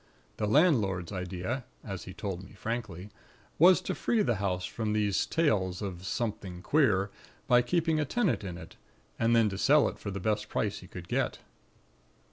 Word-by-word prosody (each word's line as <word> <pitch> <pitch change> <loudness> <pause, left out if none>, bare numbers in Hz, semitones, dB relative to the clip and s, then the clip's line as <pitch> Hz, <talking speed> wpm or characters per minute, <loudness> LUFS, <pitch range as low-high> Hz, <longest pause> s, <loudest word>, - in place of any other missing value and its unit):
The 105 - -1
landlord's 105 - +3
idea 90 +6 -3 0.2
as 95 -3 -6
he 95 - -8
told 95 -3 -4
me 95 - -14
frankly 105 -5 -5 0.5
was 180 +3 +7
to - - -2
free 230 -3 +1
the 120 -5 +1
house 95 -2 -1
from 110 0 -2
these 105 -2 +1
tales 100 - +1
of 95 -2 -5
'something 95 -6 -3
queer,' 105 -9 +2 0.3
by 125 0 +5
keeping 160 +3 +1
a 150 - +1
tenant 130 - 0
in 90 -3 -5
it, - - -12 0.4
and 115 +1 +3
then 115 -2 +5
to 95 -1 -5
sell 145 +4 +5
it - - -10
for 100 - -5
the 100 0 -4
best 105 +2 -1
price 105 -2 -1
he 90 - -12
could 90 -2 -9
get. - - 0
105 Hz, 180 wpm, -30 LUFS, 95-120 Hz, 0.5 s, was